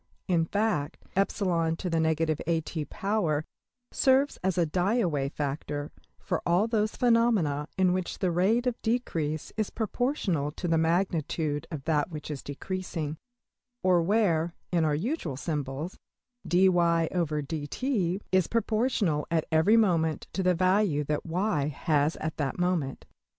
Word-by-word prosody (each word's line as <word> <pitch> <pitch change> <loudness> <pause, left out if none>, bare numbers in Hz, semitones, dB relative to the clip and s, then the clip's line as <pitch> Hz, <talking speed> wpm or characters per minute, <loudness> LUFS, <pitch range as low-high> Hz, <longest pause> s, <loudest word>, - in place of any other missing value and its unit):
In 170 -3 +2
fact 205 -6 -1 0.2
$\epsilon^{ 175 -4 +1
at}$ - - -20 2.1
serves 270 +2 +3
as 190 0 0
a 175 - +3
\emph{die 185 +9 +1
away 150 -10 0
factor} 145 0 -4 0.3
for - - -2
all 175 +5 +3
those 215 -2 0
phenomena 225 - +2
in 185 -1 +3
which 185 -1 -2
the 185 -2 0
rate 200 +8 +2
of 250 -2 -1
decrease 165 -10 -2
is 215 -2 0
proportional 215 - -1
to 175 - -4
the 165 -1 +2
magnitude 160 -3 0
of 155 -5 -6
that 150 0 +1
which 155 -2 -6
is 140 - -5
decreasing; 160 0 -4 0.7
or 180 -2 +4
where, 170 -4 +1 0.2
in 170 -2 +2
our 150 -1 +2
usual 170 - -2
symbols, 150 +2 -4 0.5
$\dfrac{dy}{dt}$~is 175 - +1
proportional 220 - +1
at 165 -2 +1
every 160 +8 +5
moment 165 -7 +2
to 195 - -1
the 180 -1 +3
value 185 -4 +2
that~$y$ 160 +2 -1
has 150 +1 +1
at 155 0 -4
that 145 -4 -2
moment. 175 -7 -1
170 Hz, 125 wpm, -28 LUFS, 150-200 Hz, 2.1 s, every